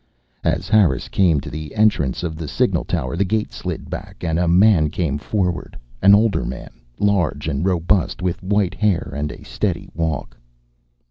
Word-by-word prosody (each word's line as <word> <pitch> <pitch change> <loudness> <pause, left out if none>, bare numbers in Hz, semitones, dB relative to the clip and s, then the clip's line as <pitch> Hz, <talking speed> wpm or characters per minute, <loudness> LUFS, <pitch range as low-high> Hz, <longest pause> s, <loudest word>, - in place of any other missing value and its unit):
As 95 - 0
Harris 100 - +3
came 85 -7 +3
to 75 - -8
the 75 -1 -7
entrance 100 - +2
of 80 -2 -3
the 80 0 -6
signal - - +1
tower 65 +6 -2
the 95 - +2
gate 105 +3 -1
slid - - -5
back - - -8
and 80 -1 0
a 90 - +1
man 90 -3 +5
came 75 -3 -2
forward, 90 -1 -2 0.2
an 100 +1 +8
older 110 -1 +2
man, - - -6 0.3
large 85 -8 +1
and 70 0 -1
robust, 90 0 +1
with 90 -1 -2
white 100 -1 +1
hair 105 -5 0
and 75 +1 -2
a - - -11
steady - - -3
walk. 80 -3 -3
85 Hz, 175 wpm, -20 LUFS, 75-100 Hz, 0.3 s, an